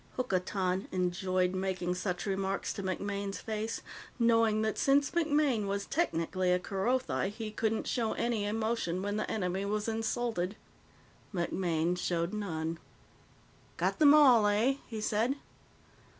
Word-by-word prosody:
Hokotan 190 Hz, -5 st, -1 dB
enjoyed 185 Hz, 0 st, 0 dB
making 185 Hz, -1 st, -1 dB
such 180 Hz, 0 st, -3 dB
remarks 195 Hz, -1 st, -1 dB
to -, -, -5 dB
MacMaine's 200 Hz, +1 st, -3 dB
face, 220 Hz, 0 st, -4 dB, 0.3 s
knowing 230 Hz, -2 st, +3 dB
that 220 Hz, -1 st, -1 dB
since 280 Hz, +1 st, +3 dB
MacMaine 295 Hz, -, +2 dB
was 200 Hz, 0 st, -2 dB
technically 185 Hz, -, 0 dB
a 180 Hz, -, +4 dB
Kerothi 195 Hz, +4 st, -1 dB
he 215 Hz, +1 st, -6 dB
couldn't 220 Hz, 0 st, -1 dB
show 230 Hz, -3 st, 0 dB
any 235 Hz, -3 st, -1 dB
emotion 220 Hz, -4 st, -1 dB
when 205 Hz, +1 st, -1 dB
the 215 Hz, -, -2 dB
enemy 190 Hz, -2 st, -1 dB
was 210 Hz, +1 st, -1 dB
insulted. 225 Hz, -3 st, -1 dB, 0.8 s
MacMaine 175 Hz, -2 st, 0 dB
showed 170 Hz, +1 st, -1 dB
none. 165 Hz, -6 st, -3 dB, 1.0 s
"Got -, -, 0 dB
them 300 Hz, -1 st, +8 dB
all, 250 Hz, -8 st, +7 dB
eh?" 225 Hz, +7 st, +2 dB
he 220 Hz, -2 st, -5 dB
said. 225 Hz, +5 st, +1 dB
205 Hz, 130 wpm, -31 LUFS, 185-230 Hz, 1.0 s, them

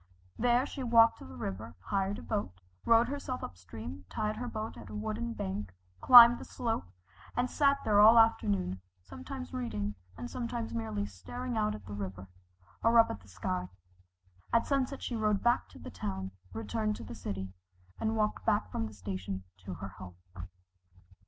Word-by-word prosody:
There 245 Hz, +2 st, +3 dB
she 285 Hz, -, -6 dB
walked 230 Hz, -2 st, +5 dB
to -, -, -10 dB
the 85 Hz, 0 st, -11 dB
river, 95 Hz, +2 st, -5 dB
hired 195 Hz, -, -1 dB
a -, -, -9 dB
boat, 150 Hz, -, -3 dB, 0.3 s
rowed 230 Hz, +1 st, +5 dB
herself 270 Hz, -2 st, -4 dB
up -, -, -6 dB
stream, 95 Hz, 0 st, -9 dB
tied 215 Hz, 0 st, -2 dB
her 245 Hz, +2 st, -4 dB
boat 220 Hz, -1 st, -4 dB
at 105 Hz, -4 st, -11 dB
a 105 Hz, -, -7 dB
wooden 110 Hz, +2 st, -3 dB
bank, 100 Hz, -1 st, -4 dB, 0.3 s
climbed 240 Hz, -1 st, +10 dB
the -, -, -7 dB
slope, 225 Hz, -, -2 dB, 0.5 s
and 245 Hz, +1 st, +2 dB
sat 280 Hz, -1 st, +4 dB
there 205 Hz, -1 st, +4 dB
all 220 Hz, +2 st, +9 dB
the 230 Hz, -, +10 dB
afternoon, 100 Hz, -, +1 dB, 0.2 s
sometimes 85 Hz, -2 st, -8 dB
reading, 105 Hz, -5 st, -2 dB, 0.2 s
and 120 Hz, -, -5 dB
sometimes 235 Hz, -, -4 dB
merely 110 Hz, -3 st, -2 dB
staring 240 Hz, -, -6 dB
out 215 Hz, -1 st, +1 dB
at -, -, -11 dB
the 100 Hz, -, -8 dB
river, 95 Hz, -2 st, -6 dB, 0.6 s
or 230 Hz, +1 st, +5 dB
up 230 Hz, -, +6 dB
at -, -, -6 dB
the 95 Hz, -, -20 dB
sky. 90 Hz, -1 st, -3 dB, 0.8 s
At 230 Hz, -, +3 dB
sunset 275 Hz, -1 st, -1 dB
she 240 Hz, -, -3 dB
rowed 215 Hz, -2 st, +1 dB
back 240 Hz, +1 st, +2 dB
to -, -, -14 dB
the -, -, -9 dB
town, 95 Hz, -2 st, -4 dB, 0.2 s
returned 210 Hz, -, -2 dB
to -, -, -8 dB
the -, -, -8 dB
city, 95 Hz, -3 st, -5 dB, 0.5 s
and 220 Hz, 0 st, 0 dB
walked 215 Hz, -1 st, 0 dB, 0.2 s
from 110 Hz, -, -2 dB
the 110 Hz, -, -10 dB
station 95 Hz, 0 st, -5 dB, 0.2 s
to 95 Hz, -2 st, -5 dB
her 100 Hz, +4 st, -7 dB
home. 90 Hz, -1 st, -11 dB
115 Hz, 180 wpm, -31 LUFS, -, 0.8 s, climbed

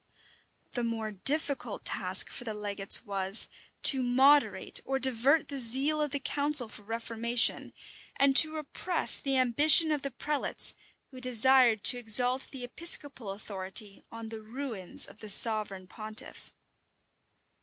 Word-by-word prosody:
[*] -, -, -42 dB
The 245 Hz, -, -5 dB
more 225 Hz, -2 st, -6 dB
difficult 280 Hz, -, 0 dB
task -, -, +1 dB
for -, -, -10 dB
the 220 Hz, -3 st, -8 dB
legates 205 Hz, +1 st, +2 dB
was, 195 Hz, 0 st, -1 dB, 0.4 s
to 265 Hz, -2 st, +7 dB
moderate 260 Hz, -1 st, 0 dB
or 270 Hz, 0 st, -4 dB
divert 265 Hz, +4 st, 0 dB
the 280 Hz, -1 st, -7 dB
zeal 270 Hz, +6 st, +1 dB
of 300 Hz, -, -3 dB
the 285 Hz, +1 st, -5 dB
council 285 Hz, -2 st, -2 dB
for 215 Hz, -, -14 dB
reformation, 230 Hz, +2 st, -3 dB, 0.4 s
and 275 Hz, -1 st, +1 dB
to 315 Hz, 0 st, +5 dB
repress 315 Hz, +3 st, +1 dB
the 275 Hz, -1 st, -3 dB
ambition 295 Hz, +6 st, +2 dB
of 295 Hz, -2 st, -3 dB
the 275 Hz, -, -6 dB
prelates, 290 Hz, +3 st, 0 dB, 0.4 s
who 255 Hz, -1 st, -14 dB
desired 250 Hz, -2 st, +1 dB
to 250 Hz, -, +5 dB
exalt 245 Hz, +3 st, 0 dB
the 265 Hz, -3 st, -11 dB
episcopal 275 Hz, -4 st, 0 dB
authority 195 Hz, 0 st, -7 dB
on 230 Hz, -1 st, -11 dB
the 220 Hz, -1 st, -10 dB
ruins 225 Hz, -4 st, 0 dB
of 210 Hz, -, -17 dB
the 215 Hz, -, -10 dB
sovereign 205 Hz, -3 st, +3 dB
pontiff. 215 Hz, +2 st, -7 dB
245 Hz, 145 wpm, -27 LUFS, 215-275 Hz, 0.4 s, to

